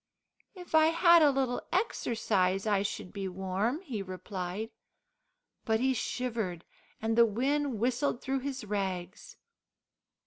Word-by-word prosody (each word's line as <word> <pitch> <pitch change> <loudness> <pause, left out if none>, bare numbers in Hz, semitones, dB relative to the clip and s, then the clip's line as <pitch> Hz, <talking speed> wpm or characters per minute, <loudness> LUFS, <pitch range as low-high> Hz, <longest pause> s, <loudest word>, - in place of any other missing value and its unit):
"If 360 -2 -11
I 315 0 +6
bad 340 0 +6
a 300 - +7
little 265 -3 0
exercise, 220 - 0
I 205 -2 +2
should 195 -2 -4
be 195 -2 -3
warm," 190 - -2
he 245 - -4
replied. 185 +2 -5 0.9
But 220 0 +1
he 260 +2 +2
shivered, 225 -8 -3 0.3
and 225 0 0
the 235 0 +6
wind 270 +4 0
whistled 250 +2 0
through 270 +1 -1
his 265 -3 -5
rags. 190 - -4
225 Hz, 130 wpm, -30 LUFS, 195-270 Hz, 0.9 s, a